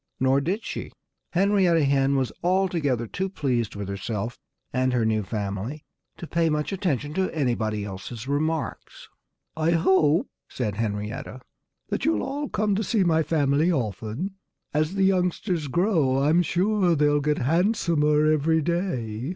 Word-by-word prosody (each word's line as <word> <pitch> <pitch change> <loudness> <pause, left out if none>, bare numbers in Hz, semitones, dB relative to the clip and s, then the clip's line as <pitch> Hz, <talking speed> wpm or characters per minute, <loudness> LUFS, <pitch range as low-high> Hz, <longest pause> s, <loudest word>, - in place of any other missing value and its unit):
Nor 130 +1 +3
did 195 +9 -2
she. - - -5 0.4
Henrietta 185 -3 +3
Hen 135 0 +2
was 130 -2 0
altogether 170 -9 +1
too 190 - -3
pleased 125 - -1
with 100 -1 -5
herself 100 +3 -4 0.3
and 130 0 +1
her 120 -3 +2
new 110 -1 +1
family 105 +7 -4 0.3
to - - -7
pay 165 0 +1
much 150 +2 -1
attention 150 -6 -1
to 190 +2 0
anybody 115 -8 -1
else's 105 +5 -7
remarks. 155 +3 -3 0.5
"I 160 +2 +1
hope," 165 - +3 0.2
said 110 -5 -2
Henrietta, 105 +3 -4 0.5
"that - - -2
you'll 105 -1 +1
all 290 +1 -3
come 210 -1 0
to 210 +3 0
see 210 0 +1
my 160 -2 +3
family 150 +1 +2
often. 120 - -3 0.4
As 155 +5 0
the 195 - +2
youngsters 180 -3 0
grow, 160 -4 +2
I'm 160 +4 +4
sure 180 +1 +2
they'll 145 -1 +3
get 150 +1 +1
handsomer 160 - +2
every 155 +1 +2
day." 135 - -2
150 Hz, 145 wpm, -25 LUFS, 125-175 Hz, 0.5 s, I'm